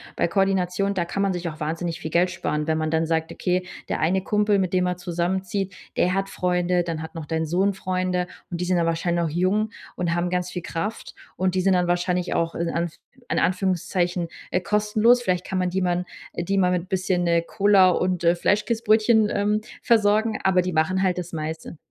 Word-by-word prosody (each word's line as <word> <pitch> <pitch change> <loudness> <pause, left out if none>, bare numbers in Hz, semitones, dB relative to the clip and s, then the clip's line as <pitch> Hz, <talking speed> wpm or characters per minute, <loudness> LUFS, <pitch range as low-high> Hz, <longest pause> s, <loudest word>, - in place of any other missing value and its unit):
bei - - +1
Koordination, 195 +1 +1
da 175 - 0
kann 195 +3 -3
man 195 -1 +2
sich 175 -1 -3
auch 155 -1 -6
wahnsinnig 165 +2 -3
viel 160 - -5
Geld 180 +2 +3
sparen, 150 -3 -2
wenn 160 - +1
man 155 0 -1
dann 160 0 +1
sagt: 160 0 -1
„Okay, 180 0 -1 0.2
der - - -2
eine 185 +4 +1
Kumpel, 210 0 +2
mit 185 -1 -1
dem 180 0 +2
er 180 - -2
zusammenzieht, 180 +2 -2 0.2
der 180 +1 +2
hat 195 0 0
Freunde, 180 0 +1
dann 165 -2 -4
hat 160 - -8
noch 160 - -5
dein 160 0 -1
Sohn 190 +5 +1
Freunde.“ 185 -1 -1 0.2
Und 175 -1 -4
die 180 - 0
sind 180 0 +1
dann 170 - +2
wahrscheinlich 170 +1 0
noch 160 - -1
jung 185 +6 +1 0.3
und 175 -1 -1
haben 175 +1 0
ganz 180 0 -1
viel 180 -2 -5
Kraft. 190 +8 -4 0.2
Und 185 0 +1
die 185 - +1
sind 190 0 +3
dann 180 -1 +2
wahrscheinlich 180 0 0
auch, 165 0 -1
in 170 0 -1
Anf 170 -1 -2 0.4
in - - +1
Anführungszeichen, 180 -1 0 0.2
äh, 180 - +1
kostenlos. 210 +4 +3
Vielleicht 180 -5 -1
kann 190 - -2
man 180 -1 +1
die 190 +1 -1
man 180 0 0 0.3
äh, 170 - -3
die 195 +3 -1
mal 180 -1 +3
mit 180 0 -2
bisschen, 185 -2 0
äh, 170 0 +3
Cola 200 -1 +4
und 180 -1 0
äh, 170 - +5
Fleischkäsbrötchen, 215 +2 +2
ähm, 210 +1 +1 0.2
versorgen, 220 0 +3
aber 185 -1 +4
die 180 -1 -3
machen 185 +5 +1
halt 180 -1 +1
das 175 0 -6
meiste. 160 +1 -5
180 Hz, 215 wpm, -24 LUFS, 170-195 Hz, 0.4 s, äh